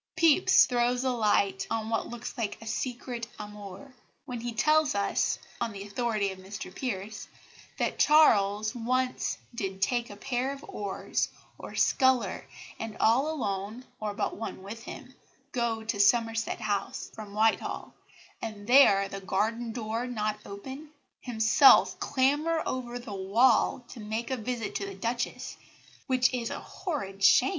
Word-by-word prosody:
Pepys 330 +1 +6
throws 245 0 +1
a 260 - +1
light 200 -4 +1
on 225 -1 -2
what 225 - 0
looks 240 0 -7
like 225 -5 -3
a 225 - -11
secret 240 0 -4
amour, 205 +3 -9 0.3
when 245 -2 -5
he 240 +1 -3
tells 305 +4 +3
us, 200 0 +1 0.2
on 235 -1 -1
the 200 -1 -7
authority 210 -1 -1
of 190 - -10
Mr 190 -1 -8
Pierce, 210 -4 -4 0.5
that - - -1
Charles 215 -8 +5
once 255 +1 -1 0.2
"did 195 -4 -4
take 240 +4 0
a 205 - -9
pair 250 +4 -2
of 280 +1 -11
oars 200 -8 -2 0.3
or - - -8
a - - -7
sculler, 255 -8 +2 0.4
and 225 -1 -6
all 250 +7 +3
alone, 215 -4 -3
or 210 -1 -3
but - - -2
one 205 -3 -6
with 220 +4 -8
him, - - -9 0.4
go 235 -2 -1
to 220 -2 -3
Somerset 225 +2 +2
House 215 +5 -2
(from 210 -2 -9
Whitehall), 220 +1 0 0.5
and 215 -2 -6
there, 210 -6 +6
the 195 0 -7
garden 220 +5 -1
door 225 +1 -3
not 215 -3 -2
open, 265 +9 -8 0.3
himself 240 +3 +5
clamber 295 +5 +1
over 245 -1 -3
the 235 -4 -8
wall 225 +5 +3
to 245 - -10
make 220 +4 -4
a - - +1
visit 235 -1 -3
to 200 - -4
the 195 - -7
Duchess, 235 +5 -3 0.5
which 255 -1 +3
is 235 -2 -2
a - - -4
horrid 200 - -5
shame." 255 - +6
225 Hz, 155 wpm, -29 LUFS, 205-250 Hz, 0.5 s, Pepys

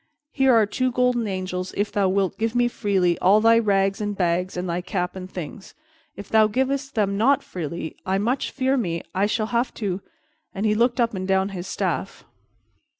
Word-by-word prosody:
Here 270 -2 +3
are 220 -2 +5
two 255 +5 -1
golden 245 -2 +1
angels 185 -1 -4
if 205 0 0
thou 200 -2 +1
wilt 195 0 0
give 225 +1 -1
me 245 0 +3
freely 190 -7 0
all 195 +4 +5
thy 230 +1 +5
rags 195 -2 +1
and 205 -1 -3
bags 180 +1 0
and 180 +1 -3
thy 175 +1 -2
cap 180 0 -3
and 185 -1 -7
things. 185 +2 -8 0.4
If 200 - -9
thou 220 -1 +4
givest 270 +4 -1
them 200 -2 +1
not 270 +5 +3
freely, 170 -2 -5
I 190 +1 0
much 240 +7 0
fear 265 0 0
me 170 -8 -2
I 195 +2 +2
shall 215 +1 0
have 235 +2 +1
to 195 -3 -3 0.3
" - - -43
and 200 +3 -2
he 210 - +3
looked 240 +3 +1
up 235 -2 +2
and 185 -1 -4
down 190 0 +2
his 185 -2 -6
staff. - - -3
200 Hz, 205 wpm, -23 LUFS, 185-235 Hz, 0.4 s, are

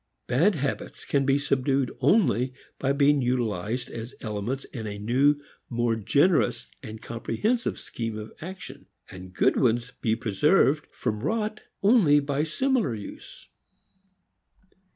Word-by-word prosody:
Bad 165 +12 +3
habits 140 -2 -4
can 140 -1 +1
be 135 0 +4
subdued 135 -2 0
only 130 - +2 0.2
by 135 - +1
being 140 0 +3
utilized 120 -2 -1
as 115 +2 -7
elements 110 +5 -3
in 110 -4 -7
a 105 0 -5
new, 135 +8 +2 0.3
more 120 -1 +1
generous 140 - +2
and 110 -4 -8
comprehensive 210 - -1
scheme 115 -2 -5
of 110 0 -8
action, 185 +4 -9 0.2
and 95 -1 -10
good 90 - +2
ones 120 0 +1
be 110 -2 +2
preserved 140 - +2
from 105 - -3
rot 215 - -2 0.2
only 195 -9 +5
by 140 0 -1
similar 230 - 0
use. 105 - -10
130 Hz, 130 wpm, -26 LUFS, 115-145 Hz, 0.3 s, only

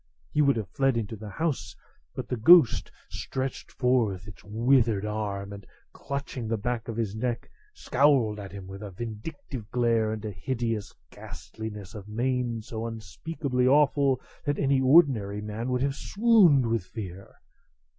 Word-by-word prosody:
He 150 - +2
would 140 -2 +4
have 110 -4 -3
fled 135 -3 +2
into 110 -1 -3
the 105 0 -9
house, 155 +7 -2 0.4
but - - -5
the - - -1
ghost 145 +3 +6 0.2
stretched 130 0 -5
forth 115 -8 +1
its 105 - -12
withered 115 -1 +2
arm, 100 -2 -3
and, 100 0 -9 0.3
clutching 140 -4 -5
the 115 0 0
back 120 +1 -3
of 115 -1 -5
his 110 -4 -1
neck, 120 +1 -3 0.2
scowled 130 -6 +2
at 100 -2 -8
him 100 -2 -8
with 95 +1 -9
a 105 - -6
vindictive 115 - -7
glare 115 -2 +2
and 110 0 -5
a 105 - -3
hideous 115 0 -3 0.2
ghastliness 105 -3 -8
of 105 -2 -9
mien 120 0 -1
so 115 +1 -5
unspeakably 125 +3 -2
awful 140 -1 +4 0.2
that 145 0 -1
any 135 -1 +2
ordinary 130 -8 +4
man 105 +4 -4
would 125 0 0
have 140 0 +1
swooned 195 - +4
with 115 -4 0
fear. 95 -1 -8
115 Hz, 155 wpm, -27 LUFS, 105-135 Hz, 0.4 s, ghost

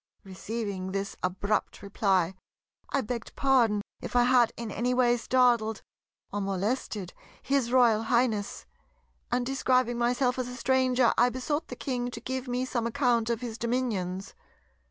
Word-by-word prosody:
Receiving 195 -1 -5
this 195 0 -3
abrupt 195 +4 -1
reply, 190 -3 +1 0.6
I 275 - +1
begged 235 0 -5
pardon 235 -7 +3 0.2
if - - -7
I 245 - +6
had 245 -2 +4
in 230 -2 -5
any 245 +4 0
way 245 -1 +4
startled 235 -3 +2 0.5
or 205 - -1
molested 195 0 -2 0.3
his 270 -4 +1
Royal 240 -4 +5
Highness; 230 -4 0 0.7
and 245 0 +1
describing 255 -2 +1
myself 250 +1 +1
as 250 - -2
a 250 - -7
stranger 255 -1 +2
I 245 - +5
besought 290 +6 -2
the 250 - -7
King 245 -1 -3
to - - -7
give 260 0 -4
me 250 +1 -1
some 235 -3 -1
account 235 -2 +1
of 235 0 -1
his 230 -2 -6
dominions. 215 -7 -2
240 Hz, 150 wpm, -28 LUFS, 210-255 Hz, 0.7 s, I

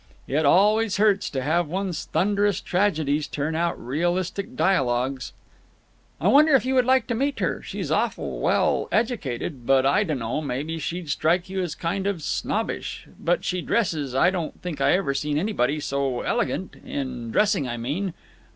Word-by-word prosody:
It 145 +2 +1
always 210 +5 +4
hurts 205 -1 +3
to 130 -3 -3
have 165 +4 +1
one's 180 0 -3
thunderous 205 +1 +1
tragedies 155 -6 0
turn 150 +2 -2
out 170 +1 -1
realistic 180 - -2
dialogues. 130 - +1 0.9
"I - - 0
wonder 300 +1 +6
if 260 - +3
you 260 - 0
would 255 -2 +3
like 260 -2 +4
to 240 - -2
meet 275 +5 0
her. - - -1
She's - - -5
awful - - -1
well - - +2
educated, 150 - -2
but 135 -1 +4
I 140 +9 +4
dunno—maybe 145 - -3
she'd 165 0 -4
strike 175 +6 +1
you 190 0 -1
as 170 -3 -3
kind 190 +3 -2
of 185 -6 -2
snobbish. - - -2
But - - 0
she 180 -1 -1
dresses 155 - -1
I 175 +7 +4
don't 175 -4 -4
think 175 -4 -4
I - - +4
ever 170 -7 +1
seen 150 +1 -1
anybody 155 - 0
so 140 -3 -1
elegant. 225 -5 -2
In 130 -4 -4
dressing, 195 - +2
I 120 -1 -3
mean. 160 +10 -3
170 Hz, 165 wpm, -24 LUFS, 140-200 Hz, 0.9 s, wonder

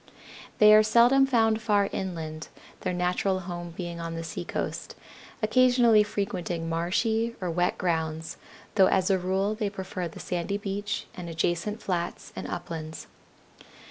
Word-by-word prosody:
They 210 0 +8
are 215 - +9
seldom 240 +5 +5
found 225 -3 +2
far 205 -3 +2
inland, 160 -4 -4 0.3
their - - -2
natural 180 +2 0
home 175 -1 -6
being 175 -2 -5
on 165 0 -4
the 165 - -4
seacoast, 165 +1 -4 0.5
occasionally 240 -1 +5
frequenting 185 -5 -2
marshy 220 +8 0
or 180 -2 -2
wet 175 +2 +1
grounds, 160 -2 -2 0.4
though 195 -3 +6
as 190 0 +2
a 190 - +3
rule 190 +3 0
they 215 -2 -2
prefer 190 -2 -5
the 165 - -11
sandy 180 +3 -2
beach 205 0 -3
and 175 -2 -7
adjacent 175 +6 -1
flats 175 -2 -3
and - - -5
uplands. 160 -2 -6
185 Hz, 140 wpm, -27 LUFS, 170-210 Hz, 0.5 s, are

